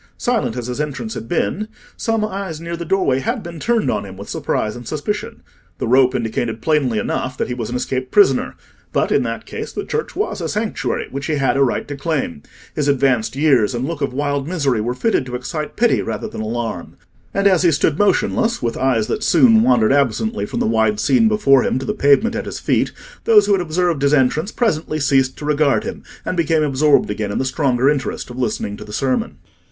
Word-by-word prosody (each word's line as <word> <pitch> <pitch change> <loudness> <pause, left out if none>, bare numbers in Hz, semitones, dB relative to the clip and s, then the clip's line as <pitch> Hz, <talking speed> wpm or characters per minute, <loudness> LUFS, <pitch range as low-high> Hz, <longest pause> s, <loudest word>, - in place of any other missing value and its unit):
Silent 230 - -1
as 120 - -4
his 125 +4 -3
entrance 150 +10 -4
had 115 - -7
been, 205 +4 -1 0.3
some 225 -2 0
eyes 195 -6 -5
near 170 +1 -5
the 170 - -5
doorway 165 -7 +1
had 230 - -2
been 170 -2 -8
turned 230 +4 +1
on 105 - -2
him 95 -1 -10
with 100 - -9
surprise 105 0 -2
and 120 -1 -9
suspicion. 160 +8 -4 0.3
The - - -3
rope 130 +1 +4
indicated 115 -1 -2
plainly 145 -8 +1
enough 130 +4 -2
that - - -2
he - - -2
was 120 -3 -4
an 125 - -4
escaped 130 +1 -2
prisoner, 405 -1 +3 0.4
but - - 0
in - - +3
that - - -4
case - - -6
the - - -5
church 455 - -3
was 420 - -2
a - - -2
sanctuary 215 +1 -2
which 135 +1 -4
he 155 - 0
had 135 -2 +1
a 140 - +2
right 130 - -1
to 145 - -5
claim; 140 - -2 0.3
his 150 -2 0
advanced 130 -5 +1
years 135 -6 +3
and 120 +2 -2
look 155 0 -4
of 140 - 0
wild 140 +1 -2
misery 140 -10 0
were 120 +3 -2
fitted 225 - +1
to 125 - -5
excite 150 +5 -5
pity 240 +1 +3
rather - - -4
than 215 - -6
alarm; 115 +1 -4 0.3
and 200 - -1
as 185 -4 +5
he 175 -2 +4
stood 145 0 +1
motionless, 220 +3 +2
with 115 -2 -2
eyes 125 -5 +1
that 215 - -3
soon 225 -1 +5
wandered 125 - +4
absently 140 - 0
from - - -4
the - - +1
wide 110 -1 +1
scene 225 - +3
before 175 -12 +4
him - - 0
to 130 - -4
the - - -1
pavement 145 +12 +3
at - - -4
his - - -5
feet, - - +1 0.3
those 440 -2 +6
who - - 0
had 195 -2 +3
observed 170 -2 0
his 140 +1 +4
entrance 150 - +1
presently 155 -9 -1
ceased 135 -2 +2
to 150 - -7
regard 150 -1 +2
him, - - -6 0.2
and - - -2
became 160 -2 +2
absorbed 145 -4 +3
again 105 -1 -3
in - - -2
the 135 - 0
stronger 130 -2 +1
interest 140 -3 -1
of 125 - -8
listening 105 -4 -2
to 105 - -9
the 105 - -11
sermon. 130 +3 -1
140 Hz, 220 wpm, -19 LUFS, 125-175 Hz, 0.4 s, those